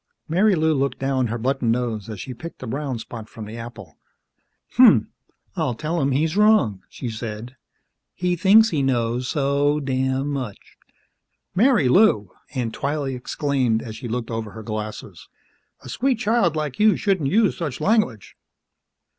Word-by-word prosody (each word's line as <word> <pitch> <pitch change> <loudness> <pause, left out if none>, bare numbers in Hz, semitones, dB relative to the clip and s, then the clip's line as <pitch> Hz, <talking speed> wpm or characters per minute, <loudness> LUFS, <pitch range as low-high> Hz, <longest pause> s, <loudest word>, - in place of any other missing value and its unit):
Marilou 170 -2 +3
looked 140 -1 -1
down 135 -2 0
her 115 +2 -3
button 125 0 0
nose 115 -3 -1
as 110 -3 -6
she 130 - -6
picked 165 +2 -9
a - - -4
brown 135 +1 -3
spot 110 -1 -9
from 110 -2 -9
the 110 +2 -8
apple. 115 -8 -10 0.8
"Hmmph, - - +7 0.5
I'll 150 -8 -1
tell 160 +6 -2
'im 135 - +1
he's 155 +5 0
wrong," 210 - +3
she 125 - -7
said. 115 +2 -6 0.6
"He 180 0 0
thinks 205 +5 +6
he 150 - 0
knows 125 -1 0
so 145 +1 +1
damn 130 0 -1
much!" 130 -8 -6 0.8
"Marilou!" 190 - +4 0.3
Aunt 120 -3 -2
Twylee 140 -1 -2
exclaimed 125 -2 -1
as 110 -2 -7
she 115 +2 -7
looked 120 0 -4
over 115 -2 -4
her 110 - -9
glasses. 105 -5 -6 0.5
"A - - -12
sweet 255 - 0
child 220 -7 +1
like 150 -4 -3
you 215 0 +5
shouldn't 190 -9 0
use 215 +4 +3
such 150 -8 -4
language!" 210 - 0
135 Hz, 155 wpm, -22 LUFS, 115-160 Hz, 0.8 s, Hmmph